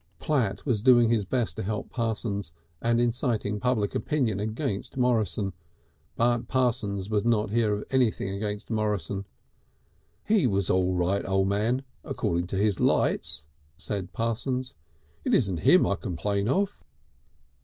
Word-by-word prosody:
Platt 115 - -1
was 120 -7 +1
doing 120 -1 +6
his 110 -4 +2
best 120 +2 -1
to - - -2
help 105 +1 -4
Parsons, 110 -7 -2 0.3
and 115 0 +2
inciting 120 -3 0
public 120 -5 0
opinion 125 -10 0
against 110 +3 -3
Morrison. 110 -6 +1 0.6
But 120 0 +1
Parsons 110 -6 0
would 105 -1 +1
not 110 -3 +1
hear 110 -1 +2
of 105 - -5
anything 125 -7 +1
against 105 +2 -4
Morrison. 105 -3 -1 1.0
"He 210 -10 +3
was 100 -4 +1
all 95 0 +2
right, 90 +3 +1
O' 95 0 +2
Man 110 +7 0 0.2
according 85 +1 -1
to 95 - -4
his 100 0 +1
lights," 75 +1 +1 0.3
said 95 +1 -4
Parsons. 125 +3 -2 0.5
"It - - +2
isn't 95 -9 +1
him - - +5
I - - +1
complain 100 +4 -2
of." 195 +7 0
110 Hz, 140 wpm, -27 LUFS, 100-120 Hz, 1.0 s, doing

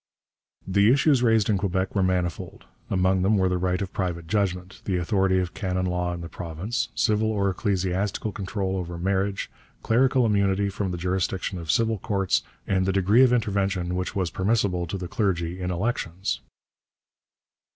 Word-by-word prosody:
The 100 +3 +4
issues 140 -1 +4
raised 115 -3 +3
in 100 -3 +2
Quebec 95 -1 -1
were 100 - +1
manifold. 90 -2 -2 0.2
Among 95 0 +2
them 100 +3 +3
were 95 -1 +2
the 90 0 0
right 90 0 0
of 95 - -7
private 90 -4 -2
judgment, 95 -1 -2
the 95 -2 0
authority 95 +2 +1
of 90 -1 -1
canon 95 -2 -2
law 90 -1 -1
in 85 -1 -5
the 85 - -6
province, 90 +9 -3
civil 110 +2 +2
or 100 -2 +1
ecclesiastical 95 +1 -1
control 95 -1 -3
over 85 -1 -4
marriage, 95 +2 -1 0.3
clerical 125 +2 +3
immunity 100 -2 +2
from 100 0 -3
the 90 - -3
jurisdiction 90 +1 -2
of 85 -2 -9
civil 110 +5 +2
courts, 95 -2 +1 0.2
and 95 -1 +1
the - - +3
degree 100 +5 +4
of 130 -2 +6
intervention 95 -6 0
which 90 +3 -3
was 90 -4 -1
permissible 95 -3 0
to 95 - -3
the 90 -1 -5
clergy 90 -6 -1
in 90 - -2
elections. 95 -1 -2
95 Hz, 170 wpm, -25 LUFS, 90-105 Hz, 0.3 s, of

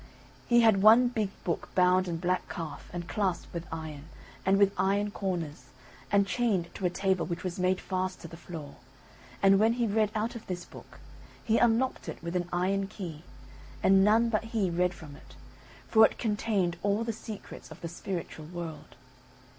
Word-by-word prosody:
He 240 0 +5
had 220 -4 +5
one 230 +4 +7
big 220 -5 -1
book 170 - -2
bound 185 0 +4
in 170 -1 -2
black 180 +2 -1
calf 160 -4 -6
and 175 -1 -5
clasped 195 -4 -2
with 170 -1 -5
iron, 155 -3 -6 0.4
and 195 +1 +3
with 200 0 +4
iron 200 +2 +1
corners, 175 -7 -4 0.5
and 200 0 +4
chained 195 -6 0
to 190 - -1
a - - 0
table 190 0 0
which 170 -1 -4
was 180 -1 -4
made 185 0 +2
fast 185 -1 -3
to - - -8
the 165 - -10
floor; 160 -4 -9 0.7
and 195 0 +6
when 220 +2 +4
he 240 0 0
read 215 0 +2
out 220 +2 -1
of 235 - -9
this 180 -1 -4
book, - - -14 0.4
he 225 0 +2
unlocked 240 +2 +1
it - - -5
with 170 +1 -4
an 175 -1 -1
iron 195 +2 0
key, 170 -7 -7 0.6
and 195 0 +6
none 225 +3 +4
but 215 -1 0
he 220 -5 0
read 180 +1 +1
from 150 -4 -11
it, 135 -2 -16 0.5
for 220 -1 +6
it - - +4
contained 205 -5 0
all 205 +2 +1
the 230 0 -2
secrets 215 -1 -9
of - - -11
the 170 - -4
spiritual 170 -2 -6
world. 170 -2 -7
190 Hz, 185 wpm, -29 LUFS, 175-215 Hz, 0.7 s, one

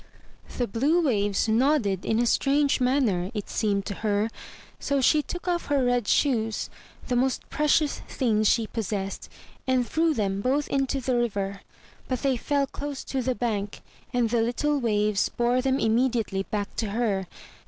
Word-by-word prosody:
The 245 - +1
blue 295 - +2
waves 205 -5 +1
nodded 225 - +2
in 220 - +1
a 240 - +2
strange 280 +3 +2
manner, 245 -9 +1
it 210 - -4
seemed 200 -3 0
to - - -3
her, 210 +1 0 0.5
so 280 -1 0
she 300 +4 +4
took 355 +4 -7
off 350 -1 -1
her 280 -3 +2
red 245 -3 +1
shoes, 225 -6 +1 0.4
the 250 - 0
most 255 +1 0
precious 300 0 +2
things 215 -4 +1
she 230 - +2
possessed, 200 -3 -4 0.4
and 255 -2 +2
threw 320 -1 +1
them 195 -3 -1
both 275 +5 +1
into 270 0 0
the 255 0 0
river. 200 -4 -2 0.5
But 255 0 -3
they 270 -2 +2
fell 280 +3 0
close 285 +1 -6
to 265 - -2
the 255 0 -1
bank, 210 -5 -3 0.3
and 240 -2 +1
the 235 -1 +2
little 285 +6 0
waves 210 -4 +1
bore 240 +1 +1
them 265 0 +1
immediately 225 -4 +1
back 205 -1 -3
to 220 - -1
her. 200 -4 -1
240 Hz, 165 wpm, -26 LUFS, 210-270 Hz, 0.5 s, she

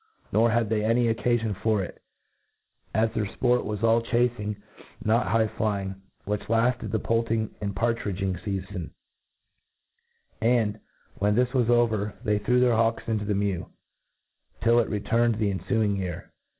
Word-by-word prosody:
Nor 115 +2 +4
had 115 0 +2
they 110 -1 +1
any 115 +1 +3
occafion 115 -2 0
for 105 0 +1
it, - - -9 0.9
as 110 +1 +1
their 110 -3 -1
fport 125 -1 +2
was 105 +1 -4
all 115 0 +4
chacing, 115 -3 0 0.5
not 115 +3 +2
high 115 -1 +2
flying, 100 -3 -2 0.3
which 105 0 -1
kfted 115 0 +1
the 110 - 0
poulting 115 -1 0
and 100 -1 -3
partridging 100 -4 -1
feafon; 95 -1 -5 1.5
and, 110 -2 +2 0.4
when 105 +1 +2
this 125 +1 +2
was 125 -3 +2
over, 110 -4 +2
they 105 -1 +1
threw 125 +5 +2
their 125 -1 +4
hawks 115 0 +1
into 110 -2 -1
the 105 0 0
mew, 100 -3 -1 0.9
till 115 +1 +5
it 120 - +1
returned 115 +2 +1
the 105 -2 0
enfuing 105 0 0
year. 90 -3 -5
110 Hz, 150 wpm, -26 LUFS, 105-115 Hz, 1.5 s, till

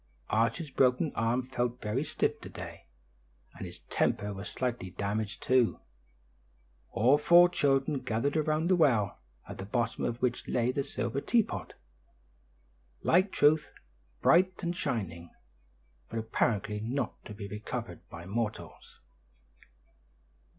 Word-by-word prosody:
Archie's 115 +8 +1
broken 130 +4 +3
arm 115 +3 +1
felt 125 -1 -2
very 110 +6 -1
stiff 155 +1 -1
to - - -8
day, - - -9 0.7
and - - -6
his - - -11
temper 105 0 +1
was 100 +1 -6
slightly 120 -7 -3
damaged, 100 +3 -3
too. 125 -3 +3 1.1
All 130 +7 +4
four 175 +3 +7
children 140 -3 +1
gathered 125 +3 -1
around 155 0 +1
the 185 +1 +4
well, 125 - +2 0.3
at - - -8
the 95 - -4
bottom 120 +2 -1
of 120 0 -1
which 125 -1 -1
lay 120 0 +1
the 140 +2 -1
silver 120 +1 -3
teapot, 230 +4 0 1.3
like 185 +3 +4
truth, 150 0 +3 0.5
bright 185 +1 +4
and 170 +1 -1
shining, 85 - -3 0.8
but 115 - -5
apparently 110 -1 0
not 120 +6 -3
to 105 - -8
be 100 -1 -6
recovered 105 +2 -5
by 85 0 -9
mortals. 105 +3 -5
125 Hz, 130 wpm, -30 LUFS, 110-145 Hz, 1.3 s, four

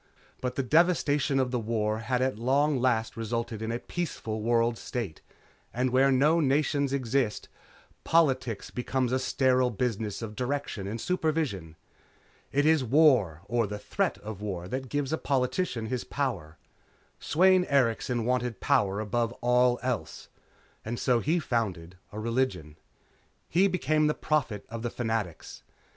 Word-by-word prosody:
But 125 0 -2
the 135 - 0
devastation 150 -2 +2
of 130 -2 0
the 125 - 0
war 110 -1 -1
had 125 +2 0
at 130 -5 -1
long 140 +3 +2
last 120 -3 +1
resulted 115 0 -3
in 110 +1 -2
a 115 - -1
peaceful 120 -8 -4
world 115 +1 +2
state, 110 -11 -5 0.5
and 125 +1 0
where 135 +2 +4
no 150 +6 +4
nations 140 -1 +1
exist, 130 -4 -1 0.5
politics 130 -9 +1
becomes 125 0 -1
a 130 - +1
sterile 130 -1 +2
business 115 -2 -2
of 110 -1 -6
direction 125 -6 -3
and 110 +3 -4
supervision. 150 - -1 0.8
It 145 +2 +2
is 155 -3 +4
war 125 - +4
or 115 0 0
the 105 +1 -5
threat 105 - -1
of 105 -2 -7
war 90 -4 -4
that 130 0 -4
gives 145 +2 -1
a 160 - -1
politician 130 -2 -1
his 125 +2 -3
power. 95 - -3 0.6
Sweyn 185 +3 +4
Erikson 120 -4 +1
wanted 125 -3 -1
power 100 0 +2
above 115 +2 -1
all 125 0 +2
else. 125 -4 -3 0.5
And 115 +2 -4
so 125 -3 +2
he 160 +9 +1
founded 100 - -2 0.2
a 105 - -6
religion. 115 - -1 0.7
He 185 +4 +4
became 155 -4 +1
the 150 - +1
Prophet 135 -9 -1
of 115 0 -6
the 120 - -2
Fanatics. 110 -8 -4
125 Hz, 150 wpm, -28 LUFS, 110-140 Hz, 0.8 s, where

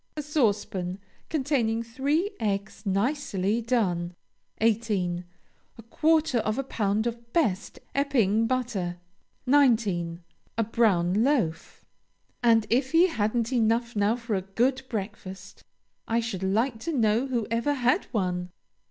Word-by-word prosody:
A 300 - -2
saucepan, 205 - 0 0.3
containing 260 -7 0
three 285 - 0
eggs 205 -2 -2
nicely 205 -1 0
done. 180 -8 0 0.4
18. 210 -6 +1 0.5
A 230 - -11
quarter 310 +2 +2
of 215 +1 -1
a 275 - 0
pound 215 -4 -1
of 235 0 -5
best 210 - 0 0.2
Epping 230 -6 +2
butter. 225 -9 -2 0.5
19. 215 -11 +2 0.3
A 230 - +3
brown 205 -3 +2
loaf. 225 - -1 0.6
"And 225 -2 +4
if 260 +4 +1
he 345 +3 +6
hadn't 230 -2 0
enough 235 0 +1
now 205 +2 +2
for 235 -2 -4
a 190 - +1
good 245 +8 0
breakfast, 195 -2 -6 0.4
I 230 +1 +1
should 225 -5 -3
like 220 +5 0
to 335 - -3
know 225 +3 +2
who 240 -4 -1
ever 235 +6 +1
had 250 -1 +2
one?" 180 -5 -2
225 Hz, 125 wpm, -27 LUFS, 200-255 Hz, 0.6 s, he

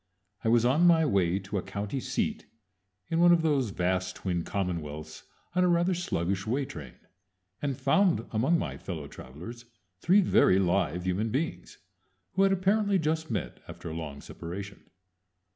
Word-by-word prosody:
I 110 - +1
was 120 0 +4
on 150 +8 +4
my 165 -2 +5
way 95 - +2
to 100 +1 -3
a - - -3
county 105 +8 -4
seat - - -2 0.6
in 165 - +1
one 175 0 +7
of 170 -1 +4
those 140 -7 +2
vast 95 0 -1
twin 90 -3 -2
commonwealths 80 -6 -4 0.3
on 180 +1 +3
a - - +4
rather 175 +1 +3
sluggish 95 - -2
way 135 +5 0
train, 75 - -9 0.7
and 140 -3 -2
found 180 - +2
among 130 +10 +2
my - - -4
fellow 80 -6 -6
travelers 90 - -10 0.3
three 185 - +5
very 135 - +4
live 90 -3 +1
human 95 +5 0
beings 140 +8 -3 0.5
who 190 - 0
had 195 0 +5
apparently 200 +2 +2
just 160 -1 -1
met 105 -7 -3
after 85 - -7
a - - -6
long 75 -4 -6
separation. 95 +4 -8
110 Hz, 160 wpm, -29 LUFS, -, 0.7 s, one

